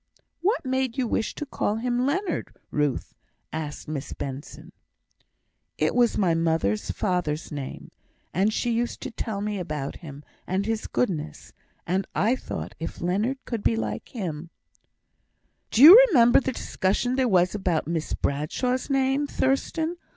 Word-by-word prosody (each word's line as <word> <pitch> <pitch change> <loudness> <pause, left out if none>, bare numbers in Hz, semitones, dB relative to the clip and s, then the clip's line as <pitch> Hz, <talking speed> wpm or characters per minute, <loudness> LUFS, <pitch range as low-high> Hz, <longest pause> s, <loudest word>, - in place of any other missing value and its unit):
"What 405 - +1
made 260 -1 -1
you 255 -2 +1
wish 220 - -1
to 295 - -4
call 215 -6 -1
him 245 +2 0
Leonard, 375 +7 -2 0.2
Ruth?" 145 -3 -1 0.4
asked 155 -2 -5
Miss 150 -3 -5
Benson. 135 +1 -7 1.1
"It - - +1
was 240 -2 +3
my 185 -5 +3
mother's 160 -11 0
father's 175 -6 -1
name; 140 -3 -7 0.4
and 195 +4 +2
she 240 +2 -1
used 235 +1 -1
to 265 - -5
tell 215 -3 -4
me 205 -1 -2
about 150 -5 -4
him 145 -4 -10 0.2
and 190 +2 0
his 225 0 -2
goodness, 160 - -2 0.3
and 185 +1 -1
I 225 +6 +3
thought 85 - -6
if 165 - -6
Leonard 215 +10 -1
could 230 -4 -3
be 115 - +2
like 110 -1 -4
him 170 - -5 0.6
" - - -47
"Do 235 - +4
you 390 +11 +12
remember 240 - +6
the 265 - -2
discussion 215 +4 -1
there 260 -1 +2
was 180 -2 +3
about 185 -6 0
Miss 165 -1 -2
Bradshaw's 250 - -1
name, 270 +1 +1
Thurstan? 315 +6 0
205 Hz, 150 wpm, -25 LUFS, 160-255 Hz, 1.1 s, you